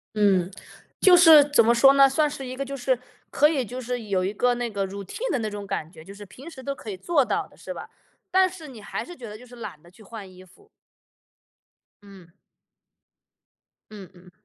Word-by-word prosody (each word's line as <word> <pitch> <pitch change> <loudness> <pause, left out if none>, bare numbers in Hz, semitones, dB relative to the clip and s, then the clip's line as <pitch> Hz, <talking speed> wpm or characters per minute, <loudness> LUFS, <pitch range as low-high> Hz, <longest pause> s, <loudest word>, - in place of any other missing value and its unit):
嗯， 195 -4 +2 0.5
就 370 -2 +7
是 325 -4 +9
怎 285 -5 +3
么 235 +1 +4
说 270 +3 +6
呢， 275 0 +6
算 300 +3 +1
是 270 -2 -7
一 255 - -6
个 275 +2 -4
就 275 +1 -6
是 255 -1 0 0.3
可 295 - +4
以 280 -5 -1
就 250 +4 -7
是 245 0 -4
有 190 -3 -1
一 195 - -2
个 245 +3 +1
那 240 -1 -3
个 200 -2 -2
routine 200 - -6
的 260 - 0
那 220 - -3
种 205 -1 -7
感 165 -5 -4
觉， 160 -2 -14
就 195 - -11
是 205 +1 -12
平 255 - -12
时 265 -5 -12
都 280 +1 -4
可 220 - -9
以 190 - -6
做 285 - +1
到 - - -2
的， - - -23
是 - - -8
吧？ - - -9 0.4
但 375 0 +4
是 345 -4 -11
你 245 -5 -11
还 - - -5
是 355 - -11
觉 245 - -10
得 210 +1 -9
就 250 - -15
是 245 0 -14
懒 155 -9 -9
得 175 - -18
去 200 +5 -19
换 205 -2 -10
衣 185 0 -15
服。 300 - -23 1.3
嗯。 190 -4 -16 1.6
嗯 200 -4 -11
嗯。 180 0 -18
235 Hz, 265 characters per minute, -24 LUFS, 195-275 Hz, 1.6 s, 是